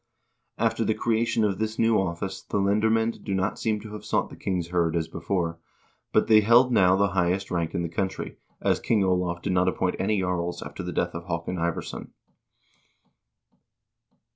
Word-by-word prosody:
After - - +1
the - - +1
creation 115 0 +1
of 100 -3 0
this 110 0 -2
new 115 0 +3
office 95 +1 -4
the - - -3
lendermcend 110 +3 +1
do 100 - -2
not 95 +2 -1
seem 110 -1 0
to 105 0 -9
have 105 - -7
sought - - -1
the - - -9
king's 90 -3 -2
kird 85 -2 +1
as 80 -1 0
before, 85 -3 -2 0.5
but - - +3
they 110 -1 +6
held 120 +4 +5
now 95 -5 +5
the 100 +1 +2
highest 95 0 0
rank 85 -2 -1
in 85 - 0
the - - -1
country, 95 +3 -4 0.2
as - - +2
King 105 -4 +1
Olav 90 -2 0
did 95 - 0
not 90 0 +2
appoint 95 0 0
any 105 +1 +1
jarls 90 -2 -2
after - - -7
the - - -4
death - - -1
of 85 0 -6
Haakon 90 +1 -3
Ivarsson. 85 0 -4
95 Hz, 185 wpm, -26 LUFS, 85-105 Hz, 0.5 s, they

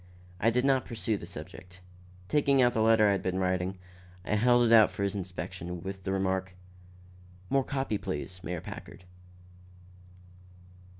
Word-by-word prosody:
I 115 - +3
did 125 +3 +1
not 135 -2 +3
pursue 110 -1 -2
the 85 - -9
subject. 90 +2 -10 0.5
Taking 140 0 +3
out 120 -1 +4
the 110 - +1
letter 110 -1 +5
I - - +4
had 100 - 0
been 95 0 -2
writing, 95 0 -1 0.5
I - - -1
held 120 +3 +4
it 115 - +4
out 110 -2 +8
for 100 - -4
his 100 - 0
inspection, 90 -2 -6
with 95 -1 -7
the 95 - -1
remark: 95 -1 -1 1.0
"More 135 -1 +3
copy, 135 -6 -2
please, 90 -2 -5
Mayor 90 -2 -4
Packard." 90 - -10
100 Hz, 160 wpm, -29 LUFS, 90-115 Hz, 1.0 s, out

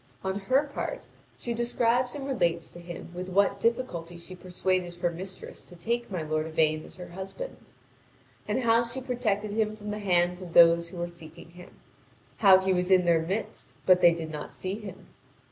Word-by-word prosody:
On 190 +1 -1
her 260 +8 +3
part 295 +12 -5 0.3
she 240 - -3
describes 240 +1 +1
and 280 -2 -5
relates 175 -11 0
to 175 - -11
him 170 0 -8
with 180 +1 -5
what 200 +2 +2
difficulty 175 -8 -1
she 170 +2 -10
persuaded 180 -1 -1
her 175 0 0
mistress 185 +2 -8
to 180 - -12
take 235 +7 -2
my 180 -5 -3
lord 155 0 -1
Yvain 155 -1 +1
as - - -10
her 180 - -8
husband, 190 - -7 0.9
and 260 - 0
how 230 0 +4
she 235 +3 -4
protected 230 -5 -1
him 215 0 0
from 210 -1 -6
the 210 - -4
hands 180 -2 +2
of 175 -2 -9
those 170 0 +6
who 180 - -10
were 175 0 -2
seeking 170 0 -12
him; 180 +1 -14 0.6
how 195 -3 +8
he 190 0 +1
was 180 0 0
in 185 -2 +5
their 170 -1 +4
midst 190 +7 -4
but 180 -1 +6
they 175 - +8
did 165 -1 -4
not 150 -1 -6
see 185 0 -4
him. 210 -3 -9
185 Hz, 195 wpm, -28 LUFS, 170-220 Hz, 0.9 s, how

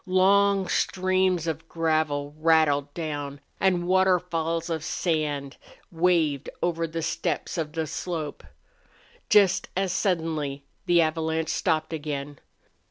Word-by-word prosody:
Long 195 +1 +4
streams 185 -2 +1
of 160 0 -4
gravel 155 -3 0
rattled 155 -3 +3
down, 145 -4 -4 0.2
and 180 -2 +2
waterfalls 180 -3 +1
of 160 -3 -3
sand 150 -5 -2 0.3
waved 165 -5 +1
over 165 -1 0
the 165 0 -4
steppes 165 -1 -2
of 155 -3 -3
the 160 0 -1
slope. 160 -1 -5 0.9
Just 205 -3 +4
as 190 -1 0
suddenly 160 -8 -1 0.2
the 175 -1 +5
avalanche 160 0 0
stopped 160 -2 0
again. 145 -2 -5
165 Hz, 110 wpm, -26 LUFS, 155-180 Hz, 0.9 s, the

